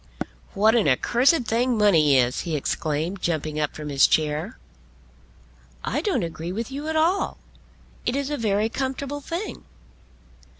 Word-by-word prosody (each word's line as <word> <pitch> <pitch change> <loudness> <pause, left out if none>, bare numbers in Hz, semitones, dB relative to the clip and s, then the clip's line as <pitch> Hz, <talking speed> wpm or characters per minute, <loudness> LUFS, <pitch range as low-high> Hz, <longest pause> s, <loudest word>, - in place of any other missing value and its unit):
"What 215 +3 +4
an 230 -7 +3
accursed 245 - +3
thing 240 +2 +1
money 160 -10 +5
is," 125 0 +2
he 165 -3 -3
exclaimed, 155 +5 -2
jumping 155 -2 -1
up 150 -1 -1
from 150 -1 -6
his 140 -1 +5
chair. 155 +8 0 1.3
"I - - -1
don't 370 - 0
agree 165 +1 -5
with 230 +7 -4
you 285 +3 -5
at 315 - -2
all. 335 +5 +1 0.7
It 245 - -1
is 280 +1 -2
a - - 0
very 215 -2 +1
comfortable 270 +3 -3
thing." 340 +8 -5
210 Hz, 145 wpm, -24 LUFS, -, 1.3 s, money